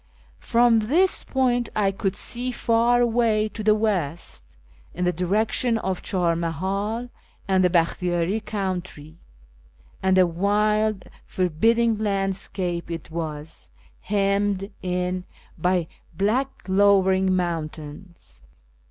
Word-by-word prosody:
From 235 -1 +3
this 320 - +2
point 245 -3 0
I 200 -2 +2
could 195 0 -2
see 245 +4 -1
far 235 0 +2
away 225 -2 +2
to 215 - -7
the 215 0 +4
west, 180 -8 -2 0.4
in 180 - -1
the 180 - +3
direction 215 +7 0
of 190 -4 -3
Char 175 -4 0
MahiU 195 +8 -2 0.4
and 190 -1 +3
the 180 - +4
Bakhtiyari 175 +3 0
country, 180 -6 -5 0.8
and 190 0 +3
a 185 - +6
wild 210 +3 +1 0.2
forbid 185 +5 +2
ding 230 -2 +2
landscape 195 -4 -2
it 165 -1 -6
was, 155 -2 -6 0.3
hemmed 200 0 0
in 180 0 -2 0.3
by 180 0 0 0.3
black 235 +8 +1 0.2
lowering 190 -1 +3
moun 170 -4 -1
tains. 160 +4 -13
195 Hz, 115 wpm, -24 LUFS, 180-215 Hz, 0.8 s, a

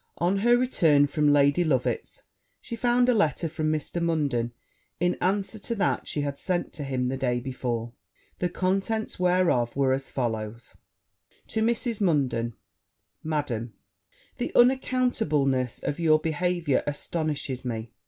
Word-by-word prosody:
On 180 +4 +1
her 240 +3 +4
return 165 - +4
from 150 0 +2
Lady 145 +3 +4
Loveit's, 135 -7 -1 0.4
she 235 - -7
found 245 +1 +2
a 250 - +5
letter 170 -5 +1
from 155 -1 -1
Mr. 155 +3 -2
Munden, 145 -8 0 0.5
in 175 +1 +2
answer 200 +3 0
to 235 +3 -3
that 200 - 0
she 150 - -2
had 140 -1 -3
sent 180 -2 -1
to 150 - -5
him 130 -2 -1
the 130 +1 -1
day 125 -2 0
before: 120 -2 -4 0.5
the 180 - 0
contents 195 +5 -1
whereof 180 -10 +2
were 135 -1 +2
as 135 0 -3
follow. 110 -4 -2 0.9
'To 220 - -1
Mrs. 230 -1 0
Munden. 130 - +1 0.7
Madam, 130 -8 -2 0.6
The - - -3
unaccountableness 225 - +2
of 145 - -2
your 155 -2 +5
behaviour 165 -2 0
astonishes 145 -3 -3
me! 115 -2 -4
155 Hz, 140 wpm, -26 LUFS, 130-185 Hz, 0.9 s, a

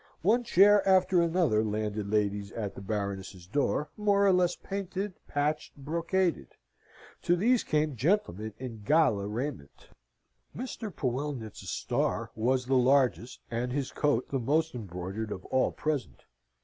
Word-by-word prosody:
One 230 +7 +3
chair 205 -1 +6
after 185 -1 +4
another 165 -11 +2
landed 105 -1 -2
ladies 105 -1 0
at 105 -4 -4
the - - -9
Baroness's 100 -3 -4
door, 145 +7 -1
more 200 -1 +3
or 195 - +5
less 180 -1 +2
painted, 195 0 -4
patched, 145 +1 -2
brocaded. 170 - -1 0.7
To 175 - +3
these 230 +7 +3
came 150 -2 0
gentlemen 110 - 0
in 120 -4 -7
gala 105 -6 +3
raiment. 110 - -5 0.7
Mr. 235 -3 -5
Poellnitz's 130 - -4
star - - -1
was 125 +3 +1
the 135 - -1
largest, 130 -1 +2
and 120 +2 -2
his 135 0 -2
coat 145 -5 0
the 135 - 0
most 155 +6 +1
embroidered 100 0 -5
of 95 - -6
all 130 0 +1
present. 150 -4 -3
135 Hz, 135 wpm, -29 LUFS, 110-175 Hz, 0.7 s, chair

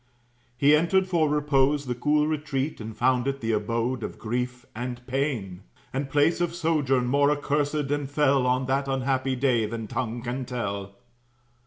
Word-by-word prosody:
He 145 +3 +5
entered 180 +5 +3
for 165 -4 +2
repose 145 -1 +2
the 125 - -1
cool 150 +5 +2
retreat, 150 -3 -2
And 110 0 -7
found 130 0 +2
it 140 0 -1
the 115 -2 -1
abode 115 +4 -1
of - - -5
grief 125 +2 -3
and 120 +1 -5
pain; 125 -9 -2 0.3
And 135 +1 -2
place 150 +5 +2
of 170 -1 -1
sojourn 150 -7 +1
more 140 +3 +3
accursed 145 0 0
and 145 -2 -1
fell 140 -3 +2
On 130 +1 +1
that 135 +1 0
unhappy 135 0 0
day, 125 -4 +2
than 115 0 -5
tongue 120 +1 -3
can 125 +2 -3
tell. 100 -5 -4
135 Hz, 165 wpm, -26 LUFS, 120-145 Hz, 0.3 s, He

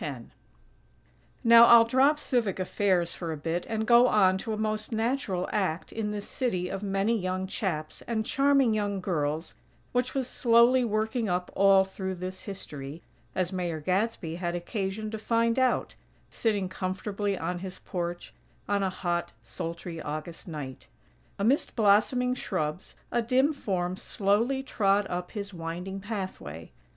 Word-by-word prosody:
X 135 -6 -5 1.2
Now 235 0 +9
I'll 235 -1 +8
drop 265 +5 +4
civic 240 -9 0
affairs 185 -2 +1
for 170 -2 -4
a 155 - -4
bit, 165 +4 -3
and 220 -1 -1
go 240 +2 +7
on 190 -4 +4
to 220 - -4
a 215 - -2
most 215 +1 -2
natural 225 -5 -1
act 185 -4 -1
in 220 -2 -2
this 210 -1 -4
city 185 -9 -1
of 195 0 -4
many 200 +3 +1
young 185 -2 -2
chaps 170 -5 -3
and 220 -2 -1
charming 275 -3 +3
young 205 -2 -1
girls 160 -3 -2 0.4
which 250 +1 -1
was 265 -2 0
slowly 240 +1 +4
working 220 0 0
up 180 0 -1
all 195 0 +6
through 190 0 -5
this 185 +1 -7
history, 150 -6 -7 0.3
as 185 0 -1
Mayor 175 -3 -2
Gadsby 180 -1 -1
had 175 -1 -2
occasion 195 +3 -3
to 220 - -4
find 230 +2 +1
out, 255 -1 +1 0.4
sitting 205 -4 0
comfortably 195 +2 -2
on 180 0 -3
his 185 0 -7
porch 175 -1 -5 0.3
on 200 0 +1
a 190 - +1
hot, 175 - -2
sultry 165 +7 -6
August 155 +4 -6
night. 145 -6 -7 0.5
Amidst 235 +9 +1
blossoming 225 +4 +3
shrubs, 180 -8 -3 0.2
a 240 - +2
dim 260 +6 +2
form 185 -9 -2
slowly 220 +8 0
trod 205 -5 +2
up 180 0 -4
his 205 -2 -5
winding 175 +3 -5
pathway. 190 - -6
195 Hz, 150 wpm, -28 LUFS, 180-225 Hz, 1.2 s, Now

